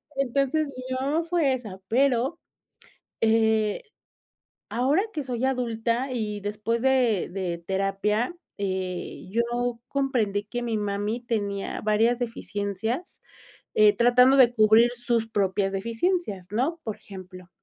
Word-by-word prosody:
Entonces 275 +3 +1
mi 255 -1 -5
mamá 285 +6 0
fue 330 -5 +1
esa. 215 -7 -6
Pero, 265 +5 +2 0.8
eh, 220 -1 +2 0.9
ahora 265 - +2
que 300 -3 -3
soy 250 -1 -4
adulta 245 0 0
y 210 -3 -2
después 215 +3 -2
de 255 -7 +2
de 180 -2 -3
terapia, 195 - 0 0.3
eh, 185 -2 -3
yo 235 +2 -1
comprendí 240 -8 0
que 240 +3 -5
mi 230 -2 -1
mami 205 +3 -2
tenía 205 -4 -2
varias 225 +3 +2
deficiencias, 225 - -4 0.5
eh, 210 -1 +6
tratando 250 +3 +6
de 245 -2 +6
cubrir 220 +2 +5
sus 235 -2 0
propias 195 -2 0
deficiencias, 225 - -1
¿no? 280 +10 0
Por 220 - -3
ejemplo, 185 -2 -11
230 Hz, 120 wpm, -26 LUFS, 205-255 Hz, 0.9 s, eh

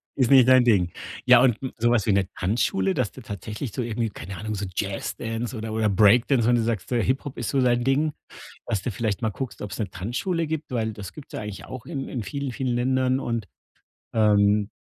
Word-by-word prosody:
Ist 130 -4 +2
nicht 130 -2 +7
dein 130 -1 +7
Ding. 95 -8 +3 0.3
Ja, 125 -1 +7
und 120 -4 +4 0.2
so 120 +1 +2
was 120 -4 +2
wie 110 - +2
'ne 95 -1 +2
Tanzschule, 95 -1 +1
dass 120 -2 -1
du 130 - -12
tatsächlich 105 - -6
so 125 - -3
irgendwie, 115 -1 -2
keine 95 -2 -8
Ahnung, 110 +3 -4
so 100 0 -3
Jazz 100 -1 -3
Dance 115 +2 -4
oder 110 0 -5
oder 110 -1 +1
Break 105 +4 +5
Dance, 125 -5 +2
wenn 120 - +5
du 120 - +2
sagst, 110 -5 -2
Hip-Hop 130 +4 0
ist - - -3
so 135 - +1
dein 120 -1 +2
Ding, 145 +4 +1 0.5
dass 105 -6 -1
du 125 - -2
vielleicht 110 0 -2
mal 110 - +2
guckst, 130 +4 -6
ob's 105 - -6
'ne 105 - -2
Tanzschule 160 - -2
gibt, 160 -1 -4
weil 110 -3 -1
das 100 -3 -8
gibt's 150 - -12
ja - - -3
eigentlich 100 -2 -7
auch 130 -3 -8
in 140 -5 -4
in 125 - -4
vielen, 140 -2 -4
vielen 125 0 -2
Ländern 130 +1 +1
und, 115 -5 -2 0.7
ähm, 105 -1 +3
115 Hz, 225 wpm, -25 LUFS, 105-130 Hz, 0.7 s, nicht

